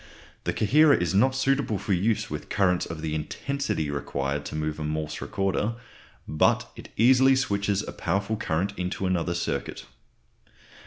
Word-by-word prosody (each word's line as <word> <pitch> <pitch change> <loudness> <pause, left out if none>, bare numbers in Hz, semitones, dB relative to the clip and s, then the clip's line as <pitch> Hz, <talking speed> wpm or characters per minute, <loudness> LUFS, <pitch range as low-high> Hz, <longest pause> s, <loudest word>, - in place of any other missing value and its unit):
The - - +1
coherer 145 +7 +5
is 85 -2 -1
not 130 +7 +3
suitable 135 -4 +1
for 100 - -1
use 100 +5 +1
with - - -6
currents 90 -3 +1
of 80 -1 -6
the 80 -1 -3
intensity 80 - -2
required 70 0 -3
to - - -6
move 75 0 -2
a - - -3
Morse 75 0 -3
recorder, 100 +3 -1 0.5
but 75 +1 +2
it - - -11
easily 130 +3 +6
switches 100 -4 0
a - - -4
powerful 100 +3 -1
current 100 -2 -1
into 90 +1 -2
another 85 -1 0
circuit. - - -3
95 Hz, 155 wpm, -26 LUFS, 80-115 Hz, 0.5 s, easily